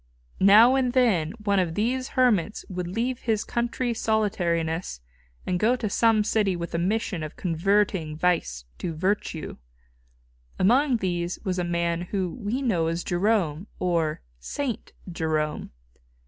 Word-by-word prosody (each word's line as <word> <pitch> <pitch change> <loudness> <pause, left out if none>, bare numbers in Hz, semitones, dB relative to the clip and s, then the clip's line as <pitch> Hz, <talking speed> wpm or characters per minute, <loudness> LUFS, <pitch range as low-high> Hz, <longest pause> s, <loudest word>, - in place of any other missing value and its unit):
Now 215 +6 +7
and 260 -2 +1
then 200 -11 +2
one 200 -2 +2
of 170 -3 -1
these 255 +4 -1
hermits 220 -7 +2
would 180 -2 -4
leave 235 +7 -2
his 220 -2 0
country 240 +1 -1
solitariness 175 - -1 0.5
and 180 -1 -1
go 230 +5 +3
to 220 -5 -3
some 225 -1 +3
city 205 -3 +1
with 170 0 -5
a 170 - 0
mission 190 -1 -1
of 155 -1 -6
converting 180 -2 0
vice 155 - 0
to 165 -2 -4
virtue. 185 -2 -2 1.0
Among 250 +6 +3
these 175 -3 -2
was 185 -3 -1
a - - 0
man 170 0 -1
whom 185 +4 -3
we 240 +7 -1
know 175 -10 +1
as 165 +1 -2
Jerome, 180 -2 0
or 165 -4 0 0.2
Saint 245 - -4 0.2
Jerome. 155 -2 -2
185 Hz, 140 wpm, -25 LUFS, 170-225 Hz, 1.0 s, Now